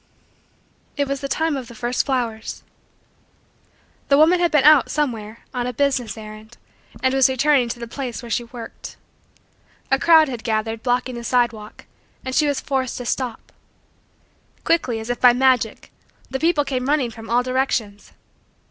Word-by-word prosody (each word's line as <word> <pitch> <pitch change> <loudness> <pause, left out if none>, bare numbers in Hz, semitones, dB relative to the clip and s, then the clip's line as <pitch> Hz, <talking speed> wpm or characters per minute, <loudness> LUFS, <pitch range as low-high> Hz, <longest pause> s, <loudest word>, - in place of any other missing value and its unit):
It 285 -1 0
was 275 0 -3
the 275 - -3
time 320 +2 0
of 260 -3 -5
the 235 - -12
first 240 +5 -1
flowers. 235 -5 -3 1.4
The 280 - +4
woman 330 +4 +5
had 345 -1 +3
been 300 -4 +3
out, 300 -1 +6
somewhere, 230 -7 -3
on 245 -1 -2
a 250 - -3
business 260 -4 0
errand 215 +1 -11 0.5
and 260 0 +2
was 270 0 +4
returning 265 -1 +2
to 240 - -4
the 235 0 -7
place 250 0 -6
where 235 - -8
she 240 +2 -1
worked. 235 -1 -10 0.9
A - - +3
crowd 320 -2 +6
had 245 -4 -6
gathered, 225 0 -2
blocking 250 +1 0
the 235 -1 -7
sidewalk, 235 -4 -1 0.4
and 260 - -4
she 300 +2 +3
was 285 -1 0
forced 265 -2 -2
to 245 - -6
stop. 250 0 -4 1.1
Quickly, 260 -9 +1
as 220 +2 -4
if 245 - -4
by 245 -1 +7
magic, 250 -3 +1 0.4
the 265 - -2
people 320 -2 +2
came 260 -1 -2
running 285 -5 +1
from 225 0 -11
all 240 +2 +2
directions. 250 -5 -2
250 Hz, 165 wpm, -21 LUFS, 230-275 Hz, 1.4 s, by